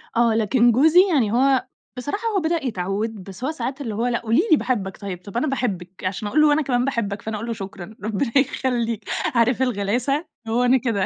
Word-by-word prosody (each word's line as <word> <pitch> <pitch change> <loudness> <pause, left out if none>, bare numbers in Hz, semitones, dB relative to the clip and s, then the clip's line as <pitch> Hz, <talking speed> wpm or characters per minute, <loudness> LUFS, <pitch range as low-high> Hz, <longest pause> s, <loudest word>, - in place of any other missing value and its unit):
آه، 230 -1 +3
لكن 235 +2 +3
جوزي 310 +9 +5
يعني 235 -9 +2
هو 260 +2 +3 0.3
بصراحة 290 - -3
هو 420 -3 +1
بدأ 320 -2 -1
يتعود، 205 0 -3
بس 195 +5 -10
هو 280 - 0
ساعات 285 -3 -4
اللي 225 -6 -4
هو 230 +3 0
لأ 235 -1 0
قولي 230 +6 +2
لي 315 - +7
باحبك 200 -9 -2
طيب، 190 -3 -6
طب 200 +3 -6
أنا 255 - +1
باحبِك، 190 - -3
عشان 190 +3 -2
أقول 295 +9 +2
له 300 -1 +5
أنا 305 - +2
كمان 250 -3 0
باحبك، 210 -7 -2
فأنا 220 -1 -4
أقول 225 +3 -6
له 230 - -1
شكرًا 195 -1 -8
ربنا 220 +3 -1
يخليك، 235 -5 0 0.3
عارف 235 +2 +3
الغلاسة، 250 - 0 0.2
هو 235 +2 +1
أنا 250 +1 +5
كده. 230 -7 0
235 Hz, 210 wpm, -22 LUFS, 205-265 Hz, 0.3 s, لي